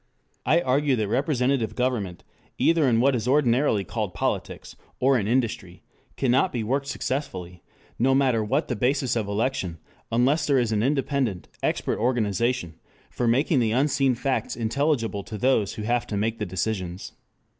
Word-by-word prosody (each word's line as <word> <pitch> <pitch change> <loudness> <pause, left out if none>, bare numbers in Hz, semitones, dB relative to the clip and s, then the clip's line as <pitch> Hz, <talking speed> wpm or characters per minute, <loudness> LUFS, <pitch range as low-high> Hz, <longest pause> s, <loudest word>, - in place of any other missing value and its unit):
I 170 +2 +4
argue 140 0 +2
that 110 -3 -1
representative 125 0 0
government, 120 -8 -2 0.3
either 165 -3 +3
in 115 -1 +3
what 135 +1 +3
is 115 -1 -2
ordinarily 130 -5 +3
called - - -4
politics, - - -3 0.2
or 135 +1 +4
in 105 -5 0
industry, 110 -7 -1 0.3
cannot 130 +7 +2
be 120 -3 -2
worked 135 +5 -1
successfully, 95 -13 -4 0.4
no 135 +3 +3
matter 130 -5 +2
what 135 +9 0
the 125 - -2
basis 130 +3 +1
of 110 -3 -1
election, 100 -5 -1 0.3
unless 125 +7 +2
there 140 -2 +3
is 120 -3 +1
an 105 -1 +1
independent, 135 - -1
expert - - -1
organization 115 -5 0 0.3
for 120 - -1
making 135 +5 +3
the 110 -2 +1
unseen 135 0 +2
facts 135 +2 -2
intelligible 115 -2 0
to 105 +2 -7
those 110 -3 +1
who 110 - -5
have 120 +2 0
to 105 - -3
make 110 +2 -1
the - - -2
decisions. 95 -1 -3
120 Hz, 160 wpm, -25 LUFS, 110-135 Hz, 0.4 s, I